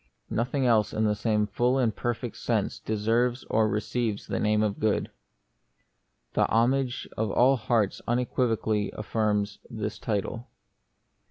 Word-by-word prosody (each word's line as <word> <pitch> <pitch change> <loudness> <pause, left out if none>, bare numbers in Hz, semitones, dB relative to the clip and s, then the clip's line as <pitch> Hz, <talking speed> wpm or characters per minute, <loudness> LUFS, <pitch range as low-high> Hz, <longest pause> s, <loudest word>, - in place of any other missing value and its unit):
Nothing 125 +4 0
else 110 -4 +3
in 110 - 0
the 105 - +3
same 105 0 +1
full 120 +5 +1
and 120 -5 +1
perfect 120 -1 -3
sense - - -1
deserves 115 +4 0
or 110 0 +3
receives 110 0 -2
the - - -2
name 105 0 +2
of 105 -2 -1
good. 110 -1 0 1.2
The - - +2
homage 125 +2 +1
of 110 -1 0
all 125 +6 +4
hearts 110 -4 0
unequivocally 115 -4 0
affirms 105 -1 -1
this 110 -3 -4
title. 115 +2 -3
110 Hz, 135 wpm, -27 LUFS, 105-120 Hz, 1.2 s, all